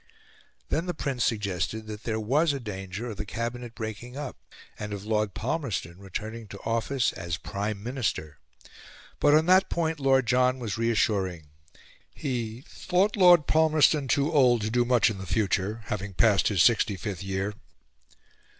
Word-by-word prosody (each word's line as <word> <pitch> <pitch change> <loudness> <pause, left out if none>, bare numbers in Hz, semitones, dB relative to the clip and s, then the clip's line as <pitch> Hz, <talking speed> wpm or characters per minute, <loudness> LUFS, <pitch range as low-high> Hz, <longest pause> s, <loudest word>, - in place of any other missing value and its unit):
Then 165 +3 -1
the 180 - -2
Prince 135 -5 -2
suggested 105 0 -2
that 105 0 -8
there 110 -1 -1
was 145 +8 +2
a 140 - -3
danger 105 0 -6
of 105 - -8
the 105 - -3
Cabinet 115 +3 -5
breaking 115 +3 -6
up, 145 -3 -5 0.4
and 105 -1 -5
of 100 0 -6
Lord 105 -2 0
Palmerston 110 - -3
returning 110 +4 -6
to 100 0 -10
office 115 +3 0
as 85 -3 -4
Prime 100 +3 -4
Minister. 110 - -3 0.8
But 145 0 +5
on 155 +1 +4
that 185 +2 +5
point 160 -2 -1
Lord 135 -2 +3
John 125 +2 +3
was 115 -5 -4
reassuring: 100 -8 0 0.7
he 120 -5 -3
"thought 185 +4 0
Lord 175 -6 +6
Palmerston 155 -2 +3
too 140 +7 +1
old 125 -5 +4
to 105 +1 -2
do 120 +1 +2
much 120 -2 +3
in 100 - -7
the 95 - -7
future 100 +3 0
(having 100 -1 -4
passed 100 -4 +4
his 100 -5 +3
sixty 110 -4 +3
fifth 95 -1 -5
year)." 95 +2 -2
115 Hz, 160 wpm, -27 LUFS, 100-135 Hz, 0.8 s, Lord